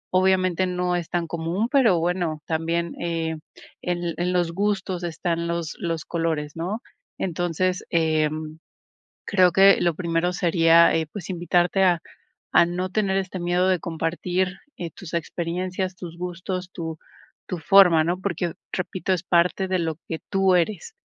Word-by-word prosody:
Obviamente, 185 -1 +3
no 180 0 -1
es 175 -2 -3
tan 170 -1 -1
común, 170 +7 -2
pero 235 - +4
bueno, 170 -3 -1
también, 165 +1 -1
eh, 165 -2 -2 0.4
en 175 -1 -2
en 180 +1 0
los 175 -2 +1
gustos 190 -2 -1
están 170 0 -2
los 170 -1 -3
los 165 -2 -3
colores, 160 -3 -2
¿no? 185 +8 -3 0.4
Entonces, 180 +1 -1
eh, 155 -2 +2 1.0
creo 185 -3 +4
que 195 +2 +6
lo 170 -2 +2
primero 170 +1 0
sería, 170 -1 +5
eh, 160 -1 0
pues, 195 -3 -7
invitarte 175 +2 +2
a 175 -3 +3 0.5
a 170 - +6
no 180 +2 -2
tener 195 -1 0
este 190 -1 -2
miedo 175 +1 +1
de 185 -1 +3
compartir, 175 +3 -2 0.2
eh, 170 -2 -5
tus 170 +1 -10
experiencias, 180 +3 -2
tus 170 -2 -9
gustos, 180 +1 -4
tu 160 -3 -5 0.5
tu 180 - -4
forma, 180 -2 +6
¿no? 175 +3 -1
Porque, 175 -3 -2 0.2
repito, 185 +1 -2
es 180 -2 0
parte 180 +2 +2
de 185 0 +1
lo 160 -2 -2
que 160 - -4
tú 195 -1 +3
eres. 215 - -1
175 Hz, 155 wpm, -24 LUFS, 165-185 Hz, 1.0 s, que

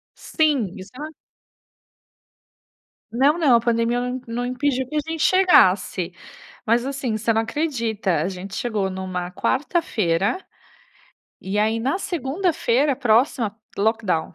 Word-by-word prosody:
Sim, 285 - 0
isso 190 +1 -10
era 295 +3 -6 2.1
Não, 275 +7 +3
não, 280 -8 +4
a - - +5
pandemia 235 +1 +1
não 250 +1 -3
não 240 +2 -3
impediu 255 0 -1
que 305 - -7
a - - +3
gente 325 -1 -3
chegasse. 190 - +4 0.5
Mas 235 +3 +2
assim, 270 -5 -2
você 230 +1 0
não 225 - +2
acredita, 225 - -1
a 180 - -1
gente 190 +1 -7
chegou 215 -5 -1
numa 185 -1 -4
quarta-feira, 220 - 0 1.0
e 195 +2 -3
aí 220 +2 +2
na 270 +10 0
segunda-feira 295 -5 0
próxima, 230 -3 +2 0.2
lockdown. 205 -7 0
235 Hz, 125 wpm, -22 LUFS, 200-275 Hz, 2.1 s, a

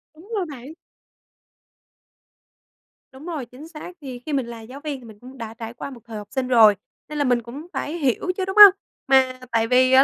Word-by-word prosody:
Đúng 355 +8 -17
rồi 370 - -1
bạn. 275 +2 -9 2.4
Đúng 270 +4 -12
rồi, 315 -8 -4
chính 255 +6 -13
xác. 330 +2 -9
Thì 255 -3 -7
khi 305 - -4
mình 270 -4 0
là 235 -1 -8
giáo 255 +5 -10
viên 290 -3 -4
thì 240 - -15
mình 215 -2 -14
cũng 260 +3 -13
đã 225 -2 -7
trải 225 0 -8
qua 260 - -7
một 250 -3 -11
thời 225 -2 -8
học 205 -1 -8
sinh 260 -1 -2
rồi, 225 -5 +6 0.3
nên 300 - -5
là 290 - +1
mình 245 -2 +2
cũng 275 +9 -10
phải 300 - -3
hiểu 295 +4 0
chứ, 375 - -1
đúng 385 +2 -5
hông? 410 -2 +12 0.3
Mà 260 -1 +3
tại 225 0 +1
vì 255 +1 +4
á 265 +1 +8
260 Hz, 220 wpm, -22 LUFS, 235-300 Hz, 2.4 s, hông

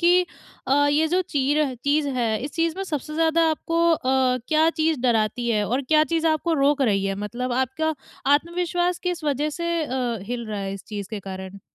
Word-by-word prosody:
कि 355 +1 +4 0.4
अ, 260 - +1 0.2
ये 310 +2 +3
जो 360 +3 +2
चीर 290 -3 0
चीज़ 290 0 +2
है 235 -5 0
इस 280 +1 -5
चीज़ 330 0 0
में 390 - -3
सबसे 305 -3 -4
ज़्यादा 325 +1 +2
आपको 330 +1 -1
अ, 260 -3 +2
क्या 315 +1 +4
चीज़ 315 -3 0
डराती 235 -1 +1
है? 210 -2 +1
और 250 +6 -1
क्या 305 +3 +4
चीज़ 325 +2 0
आपको 320 +1 +1
रोक 285 0 +2
रही 200 -6 +2
है, 195 0 -1
मतलब 240 +5 -4
आपका 265 +6 0 0.4
आत्मविश्वास 350 +2 0
किस 355 -3 -3
वज़ह 295 +1 0
से 340 +1 -2
अ, 250 -4 -2
हिल 235 +3 -5
रहा 210 -2 -4
है 195 0 -3
इस 195 - -10
चीज़ 205 -2 -6
के 215 -2 -4
कारण? 190 0 -8
285 Hz, 200 wpm, -24 LUFS, 235-320 Hz, 0.4 s, कि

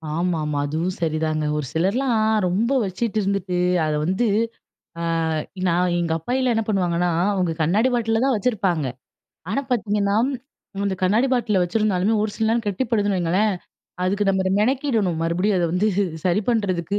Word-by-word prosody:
ஆமாமா, 160 -4 -1
அதுவும் 165 +5 -2
சரிதாங்க. 155 -1 0
ஒரு 150 - -2
சிலர்லாம் 220 +7 +1 0.3
ரொம்ப 215 +8 0
வச்சிட்டு 215 +4 -3
இருந்துட்டு, 195 -2 -1 0.3
அதை 150 -1 0
வந்து, 190 +7 +1 0.7
ஆ - - -3 0.7
நான் 175 +1 +1
எங்க 170 -1 -1
அப்பாயில்லாம் 250 +8 0
என்ன 225 - 0
பண்ணுவாங்கன்னா, 180 -3 +1 0.2
அவங்க 180 -3 0
கண்ணாடி 205 +10 +2
பாட்டிலில 225 -1 +1
தான் 265 -4 +2
வச்சிருப்பாங்க. 190 - 0 0.6
ஆனா 250 +7 0
பார்த்தீங்கன்னா, 205 -4 +1 0.7
அந்த 200 -1 0
கண்ணாடி 210 +8 +3
பாட்டிலில 215 -7 +2
வச்சுருந்தாலுமே 200 +2 +1
ஒரு 215 - -1
சில 220 - 0
நேரம் 230 -1 0
கெட்டிப்படுதுன்னு 205 -1 0
வையுங்களேன், 190 +5 +1 0.5
அதுக்கு 200 +3 0
நம்ம 190 -1 +1 0.2
மெனக்கிடணும், 225 - +1
மறுபடியும் 180 +5 +1
அத 175 - +1
வந்து 190 +4 +2 0.4
சரி 185 +3 +2
பண்ணுறதுக்கு. 200 -4 0
195 Hz, 140 wpm, -22 LUFS, 175-220 Hz, 0.7 s, கண்ணாடி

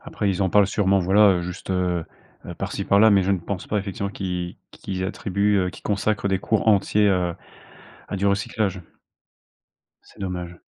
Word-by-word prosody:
Après 105 - -3
ils 95 +1 -1
en 95 - +2
parlent 100 0 +5
sûrement, 100 -1 +2
voilà, 100 +3 +5
heu, 90 - -1
juste, 90 +2 -7
heu 90 -2 0 0.4
heu, - - -7
par-ci - - -4
par-là 105 +3 +5
mais 100 -2 +5
je 95 - 0
ne 95 - +1
pense 90 +2 -5
pas, 105 - 0
effectivement, 100 0 -4
qu'ils 90 -3 -4
qu'ils 95 -1 -5
attribuent 100 +1 0
heu, - - -2
qu'ils - - -14
consacrent 100 0 0
des 95 -1 +1
cours 110 +3 -1
entiers, 105 0 +3
heu, 90 -3 +1 0.7
à - - -3
du 100 +1 0
recyclage. 100 -1 -1 1.2
C'est - - -21
dommage. 90 -2 -5
95 Hz, 185 wpm, -23 LUFS, 90-100 Hz, 1.2 s, parlent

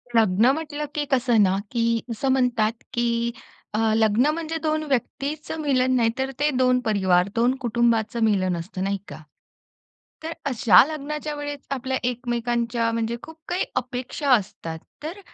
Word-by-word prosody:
लग्न 220 +2 +4
म्हटलं, 300 -1 -4
की 295 -1 0
कसं 245 -3 +3
ना, 190 0 +2
की 230 -1 +1
असं 230 +4 -1
म्हणतात 235 -4 +1
की 235 -1 0 0.4
अ, 215 - 0 0.2
लग्न 220 +4 +3
म्हणजे 325 0 -3
2 310 0 0
व्यक्तीचं 285 +5 -2
मिलन 260 -3 +2
नाही 230 -2 +3
तर 265 0 -1
ते 295 +1 +3
2 255 0 +3
परिवार, 190 -4 +3
2 240 +3 +3
कुटुंबाचं 235 -1 +1
मिलन 190 -4 +2
असतं. 185 +2 -5
नाही 200 +1 0
का? - - -8 1.1
तर 325 +1 -4 0.2
अशा 220 -5 +7
लग्नाच्या 300 0 -4
वेळेस 290 -1 -6
आपल्या 260 -1 -1
एकमेकांच्या 235 -1 -1
म्हणजे 230 +1 -1
खूप 320 - -11
काही 355 +1 0
अपेक्षा 255 +3 -3
असतात. 185 -7 -1 0.2
तर 335 +6 -5
240 Hz, 150 wpm, -24 LUFS, 225-280 Hz, 1.1 s, अशा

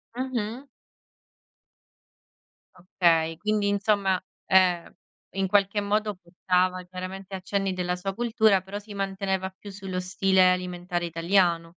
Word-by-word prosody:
Mh-mh. 255 0 -3 2.1
Okay, 165 -3 +1
quindi 210 0 0
insomma, 200 -2 +1 0.2
ehm, 180 -2 +3 0.4
in 195 0 0
qualche 205 +1 +2
modo 210 0 0
portava 180 +1 0
chiaramente 185 +1 -7
accenni 195 0 -2
della 180 -1 -1
sua 195 +2 -4
cultura, 220 -4 +3
però 195 +2 -7
si 210 0 -11
manteneva 195 -1 -2
più 205 - -10
sullo 190 -2 -5
stile 185 0 +3
alimentare 180 -1 -2
italiano. 170 0 +2
190 Hz, 110 wpm, -26 LUFS, 180-205 Hz, 2.1 s, ehm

